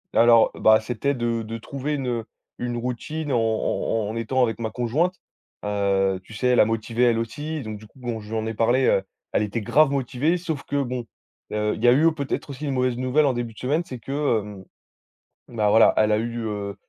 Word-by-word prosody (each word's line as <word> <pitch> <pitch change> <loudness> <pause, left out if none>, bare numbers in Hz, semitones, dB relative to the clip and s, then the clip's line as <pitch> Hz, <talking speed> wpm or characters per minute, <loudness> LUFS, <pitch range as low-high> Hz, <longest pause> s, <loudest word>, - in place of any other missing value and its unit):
Alors, 115 -1 +6
bah, 110 0 +5
c'était 125 +5 -1
de 115 -2 -1
de 115 +1 -5
trouver 140 +5 -4
une, 135 -3 -2
heu, 115 -2 -2 0.3
une 120 -1 -3
routine 135 +5 -4
en 120 - +3
en 110 -1 0
en 110 - -5
étant 120 +3 0
avec 115 -3 +1
ma 110 -1 -3
conjointe. 140 +10 0 0.5
Heu, 100 -2 +1
tu 110 - -14
sais, 125 +3 -1
elle 125 - +4
a - - +7
motivé 115 +2 -1
elle 115 -2 +4
aussi. 145 +7 -4
Donc, 110 -2 -6
du 110 - -13
coup, 130 - -20
bon, 120 -3 -4
je 105 0 -11
lui - - -2
en 110 0 -2
ai 110 - -4
parlé, 120 +4 +3
heu, 95 - +3 0.3
elle 105 - +2
était 105 +2 -3
grave 150 +7 +4
motivée, 140 +5 0
sauf 160 -4 -4
que 140 0 -1
bon, 125 -2 -3 0.5
heu, 105 0 0
il 110 - -8
y - - +5
a - - +8
eu 145 +6 +4
au 165 - +6
peut-être 145 -1 -4
aussi, 140 +2 -6
une 140 - -1
mauvaise 125 -1 0
nouvelle 130 +4 +2
en 130 - +2
début 120 -2 -4
de - - -14
semaine. 150 +7 0
C'est 125 -2 -8
que 135 -2 0
hem, 100 -2 -9 0.9
bah, 105 -1 +3
voilà, 110 +2 +6
elle 110 0 +4
a 105 - +3
eu, 120 +1 -3
heu, 100 -2 -4
120 Hz, 235 wpm, -24 LUFS, 110-135 Hz, 0.9 s, a